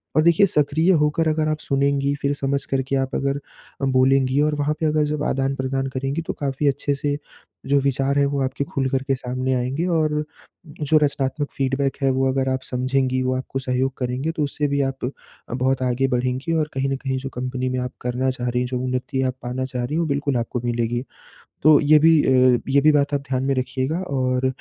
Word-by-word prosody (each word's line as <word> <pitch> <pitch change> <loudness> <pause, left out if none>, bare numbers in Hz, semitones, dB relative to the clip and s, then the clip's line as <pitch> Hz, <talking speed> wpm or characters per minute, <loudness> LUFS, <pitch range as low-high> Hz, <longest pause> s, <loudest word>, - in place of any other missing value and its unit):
और 155 - +5
देखिए 170 +4 +5
सक्रिय 155 +3 +2
होकर 150 +2 +1
अगर 155 0 +1
आप 155 0 -1
सुनेंगी, 140 0 +1
फिर 140 +1 +1
समझ 140 0 -2
कर 135 -1 0
के 135 +1 -2
आप 135 0 -1
अगर 140 +1 0 0.4
अ, 135 - +1
बोलेंगी 130 +1 +3
और 150 0 +2
वहाँ 145 +1 0
पे 160 - 0
अगर 155 0 +2
जब 150 0 -2
आदान-प्रदान 135 0 -1
करेंगी 135 +5 -1
तो - - -1
काफ़ी 140 0 -2
अच्छे 140 +1 0
से, 145 0 -1 0.5
जो 140 +1 +3
विचार 140 +1 0
हैं 140 - +4
वो 140 0 -1
आपके 130 +2 -2
खुलकर 135 -1 -1
के 135 - +2
सामने 130 +1 -2
आएँगे 130 +7 -1
और 155 -3 +1 0.6
जो 155 +1 +3
रचनात्मक 140 0 -1
फ़ीडबैक 135 0 0
है 135 - +3
वो 135 +1 +1
अगर 130 0 0
आप 130 0 -1
समझेंगी 130 0 0
वो 130 0 0
आपको 130 +1 -4
सहयोग 130 0 -1
करेंगे 130 +5 -2
तो 160 -2 -2
उससे 145 +1 -1
भी 140 0 0
आप 135 -1 -2 0.5
बहुत 130 +2 0
आगे 125 +2 +1
बढ़ेंगी 130 +4 -1
और 150 - -1
कहीं 135 +1 -1
न 135 - 0
कहीं 130 -1 -2
जो 135 +1 -5
कम्पनी 130 +1 -3
में 130 - -2
आप 125 0 -3
करना 125 +2 -1
चाह 125 -1 -3
रही 125 +1 0
हैं। 125 - -1
जो 125 0 -3
उन्नति 130 +1 -2
आप 130 0 -1
पाना 125 +1 -3
चाह 125 -2 -4
रही 150 +6 -3
हैं - - +1
वो - - 0
बिल्कुल 140 -2 0
आपको 120 +1 -3
मिलेगी। 120 0 -1 0.6
तो 155 0 +7
ये 150 0 +6
भी 160 -1 +5
अ, 130 -2 +4
ये 140 +1 +4
भी 155 +2 +5
बात 145 0 +2
आप 140 - +1
ध्यान 130 0 -1
में 135 0 +1
रखिएगा 130 +5 -1
और 130 -6 0
135 Hz, 220 wpm, -22 LUFS, 130-145 Hz, 0.6 s, तो